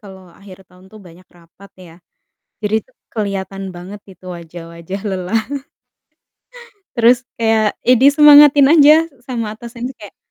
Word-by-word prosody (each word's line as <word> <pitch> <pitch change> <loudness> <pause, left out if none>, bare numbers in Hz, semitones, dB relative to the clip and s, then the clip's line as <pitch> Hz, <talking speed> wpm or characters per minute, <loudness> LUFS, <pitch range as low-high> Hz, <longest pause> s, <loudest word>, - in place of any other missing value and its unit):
kalau 190 -4 -15
akhir 195 -2 -14
tahun 180 0 -21
tuh 215 - -14
banyak 175 +2 -18
rapat 175 +4 -20
ya. 170 -3 -15 0.7
Jadi 210 0 -3
itu - - -31 0.2
kelihatan 195 -2 -5
banget 185 +4 -10
itu 185 - -20
wajah-wajah 170 +2 -10
lelah. 190 +3 -2 1.6
Terus 240 +1 +2
kayak, 220 -2 0
ya 250 - +4
disemangatin 290 0 +6
aja 300 -2 +6 0.3
sama 235 -4 -6
atasan 235 +2 -10
tuh - - -38
kayak, 205 - -14
205 Hz, 135 wpm, -16 LUFS, 185-240 Hz, 1.6 s, disemangatin